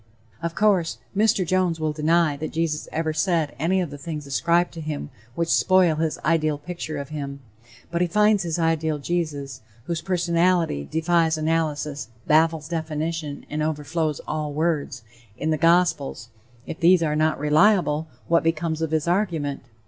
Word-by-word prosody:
Of 170 0 -3
course, 185 - +2 0.2
Mr. 205 -2 +3
Jones 180 -2 +1
will 155 -1 0
deny 160 0 +2
that 155 +1 -5
Jesus 160 -2 -2
ever 160 0 -1
said 160 -2 0
any 180 +5 +2
of 170 -5 -4
the 145 - -8
things 150 -1 -6
ascribed 170 +6 +1
to 165 - -7
him 150 - -5 0.2
which 170 0 0
spoil 185 -4 +4
his 160 -1 -1
ideal 155 -1 +2
picture 155 0 -6
of 140 -1 -6
him. 140 -2 -5 0.5
But 170 0 -1
he 180 - +3
finds 210 +3 +3
his 170 -2 -2
ideal 160 -2 +1
Jesus, 145 -4 -3 0.2
whose 165 +3 -3
personality 170 - +1
"defies 165 0 +2
analysis, 155 -3 -1 0.2
baffles 160 0 +3
definition 160 -2 -3
and 150 +1 -3
overflows 155 0 -1
all 150 -1 -3
words," 150 -6 -1 0.3
in 160 - -1
the 155 - +1
gospels; 165 -9 +2 0.4
if 165 - -7
these 175 0 +5
are 150 -1 0
not 155 +1 +1
reliable, 155 0 +3 0.2
what 170 0 +4
becomes 165 0 -1
of 160 - 0
his 160 0 -1
argument? 170 -7 0
160 Hz, 160 wpm, -24 LUFS, 150-170 Hz, 0.5 s, these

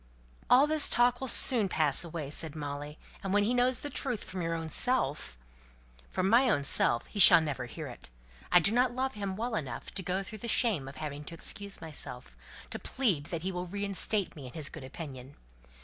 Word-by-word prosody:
"All 260 +3 +6
this 305 -1 +3
talk 245 +1 +3
will 265 - -3
soon 230 -5 +6
pass 155 -4 +2
away!" 160 -4 -6
said 160 0 -6
Molly; 145 0 -6 0.3
"and 195 0 -2
when 205 - +3
he 225 +4 0
knows 250 0 +1
the 290 - -5
truth 245 -5 -2
from 185 -1 -6
your 165 0 -2
own 165 -1 -5
self 150 - -2 0.4
" - - -28
"From 185 - -1
my 245 +5 +4
own 145 -10 +1
self 120 -3 +3
he 205 - -8
shall 175 - +10
never 140 -6 -4
hear 155 +6 -8
it. 125 - -11 0.4
I 180 - +6
do 200 - +1
not 245 +1 +1
love 265 +1 -2
him 200 -2 -5
well 230 +3 -4
enough 135 - -5
to 195 - -1
go 185 +2 -3
through 215 +2 -9
the 235 - -7
shame 210 - +1
of 135 - -10
having 150 -1 -6
to 165 - -9
excuse 200 +3 -6
myself, 140 -6 -9 0.4
to - - -5
plead 200 - -1
that 165 0 -6
he 190 - -2
will 180 0 -5
reinstate 200 +1 0
me 140 -4 -9
in 125 - -12
his 155 -3 -5
good 155 - -10
opinion. 135 -1 -9
175 Hz, 215 wpm, -30 LUFS, 145-220 Hz, 0.4 s, shall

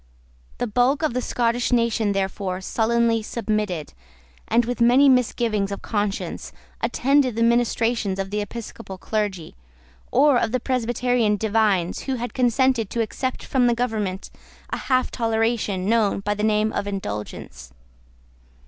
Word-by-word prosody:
The - - -1
bulk 250 +7 +1
of 310 - +1
the 250 - -1
Scottish 240 0 0
nation, 230 -3 +2
therefore, 190 -1 -2
sullenly 230 +3 +1
submitted, 210 -8 -3 0.5
and, 235 +1 +3
with 245 0 -3
many 250 +4 +6
misgivings 230 -5 +2
of 200 - -6
conscience, 205 -2 -3 0.3
attended 270 -2 +2
the 230 - +1
ministrations 230 -3 +1
of 195 0 -4
the 210 0 -1
Episcopal 210 -2 -8
clergy, 200 -5 -3 0.6
or 275 -1 +4
of 230 +2 -1
Presbyterian 245 -3 +1
divines 205 -4 +1
who 265 - +1
had 245 0 -5
consented 250 -3 +2
to 235 - -1
accept 255 +4 -3
from 255 -2 +2
the 240 - +2
government 215 -6 -2 0.4
a - - -1
half 255 -1 0
toleration, 225 -4 0
known 215 -3 +2
by 205 +1 -1
the 210 - -5
name 215 0 +1
of - - -2
the - - -3
Indulgence. 105 - -6
225 Hz, 140 wpm, -23 LUFS, 205-245 Hz, 0.6 s, many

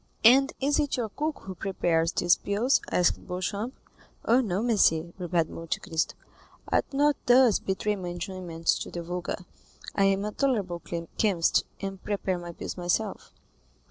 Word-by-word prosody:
"And 270 +4 +7
is 285 +3 +2
it 290 -3 0
your 230 -3 -2
cook 305 +7 -3
who 190 - -6
prepares 170 -3 0
these 175 0 +3
pills?" 220 +7 +1
asked 180 - +1
Beauchamp. 200 +6 -3 0.5
"Oh, 240 +3 +5
no, 205 -3 -1
monsieur," 170 -8 +3
replied 175 -2 +1
Monte 165 0 -4
Cristo; 165 -4 -2 0.5
"I - - +3
do 275 - -6
not 290 0 +4
thus 245 -2 +6
betray 210 +2 -1
my 185 -3 -5
enjoyments 175 -1 -2
to - - -5
the 170 - -5
vulgar. 180 +1 -4 0.5
I 195 - +3
am 195 +1 +2
a 210 - -2
tolerable 205 -11 0 0.4
chemist, 190 -6 +3 0.2
and 195 -1 -5
prepare 195 -3 -1
my 175 0 -7
pills 170 - -6
myself." 180 +5 -1
195 Hz, 160 wpm, -27 LUFS, 175-230 Hz, 0.5 s, And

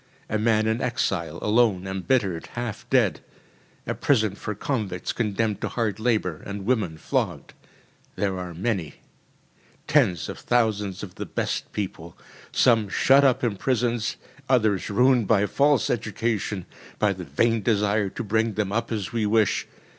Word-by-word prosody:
A 110 - +1
man 110 0 +2
in 110 +2 0
exile, 90 -9 -1
alone, 105 -4 +3
embittered, 95 -2 -1
half 120 -3 -5
dead. - - +3 0.7
A - - -1
prison 110 -8 +2
for 105 +1 -5
convicts 105 -6 -2
condemned 105 -1 -1
to - - -1
hard 110 -4 -2
labour, 110 -8 0
and 100 -1 -6
women 105 -9 0
flogged. - - -2 0.6
They 100 - 0
are 90 -3 -3
many. 90 -6 -2 0.9
Tens 85 -4 +2
of - - -7
thousands 105 -6 0
of 95 -3 -7
the - - -3
best - - -3
people. 85 -4 -5 0.3
Some 110 -4 +3
shut 135 +7 +5
up 130 -3 +3
in 110 -5 0
prisons, 120 -1 0 0.3
others 110 -8 +2
ruined 125 +1 +3
by 105 -3 +4
false 140 +4 +2
education, 110 -4 -2 0.3
by 105 -2 +2
the 95 -1 -7
vain 115 +10 +1
desire 105 -2 +1
to - - -5
bring 110 +1 +1
them 105 -2 -1
up 115 +2 -1
as 110 0 -3
we 110 -3 +1
wish. 110 -1 +2
105 Hz, 150 wpm, -25 LUFS, 95-115 Hz, 0.9 s, shut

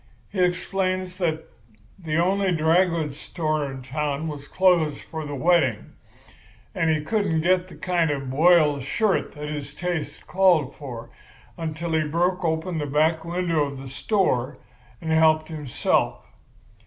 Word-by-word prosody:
He 195 - -4
explains 185 +1 0
that 160 -3 0 0.6
the 160 -4 -3
only 190 +3 +2
dry 165 +2 +4
goods 160 -5 -3
store 155 -4 -2
in 130 -1 -8
town 150 +3 -2
was 145 -2 -7
closed 175 -6 +2
for 160 -2 -6
the 145 - -5
wedding, 140 -7 +2 0.8
and 165 - +1
he 155 -1 +1
couldn't 190 -3 0
get 180 +2 +2
the - - -12
kind 175 -3 0
of 140 -2 -2
a - - -8
boiled 150 +1 +4
shirt 200 - 0
that 150 0 -6
his 150 -1 -6
taste 175 -3 -4
called 180 -7 +3
for 120 -5 -8 0.4
until 165 +1 -4
he 160 - +2
had 150 -1 -2
broke 180 +3 +1
open 160 +1 -1
the 145 - -2
back 155 +3 +2
window 170 -3 0
of 140 -1 -6
the 135 0 -8
store 140 - 0 0.4
and 160 -1 -3
helped 155 0 +4
himself. 150 -6 -1
160 Hz, 155 wpm, -24 LUFS, 150-180 Hz, 0.8 s, dry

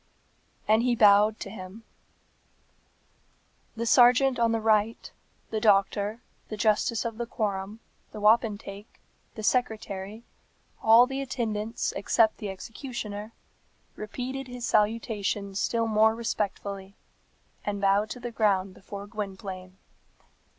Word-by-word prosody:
And 220 +1 +4
he 245 0 +2
bowed 210 0 +5
to 195 - -6
him. 200 +2 -10 1.9
The 230 +1 -3
serjeant 250 +2 +5
on 230 -1 +3
the 225 - +1
right, 220 0 +1 0.4
the 220 - -1
doctor, 205 +1 +2 0.3
the 215 - -5
justice 220 +2 +1
of 230 -1 -4
the 235 - -3
quorum, 205 0 -3 0.3
the 215 - -8
wapentake, 210 -1 0 0.4
the 215 - -7
secretary, 215 -3 -2 0.6
all 225 +2 +7
the 270 +1 -4
attendants 225 -4 -2
except 220 +2 +2
the 210 - -5
executioner, 215 0 -7 0.6
repeated 255 +5 -5
his 245 -1 -6
salutation 210 -2 0
still 230 +4 0
more 220 0 +3
respectfully, 200 -3 -4 0.7
and 205 -1 -3
bowed 200 +2 +2
to 250 - -6
the 240 0 -6
ground 195 -4 +1
before 200 +2 -9
Gwynplaine. 195 -3 -7
215 Hz, 115 wpm, -27 LUFS, 200-230 Hz, 1.9 s, all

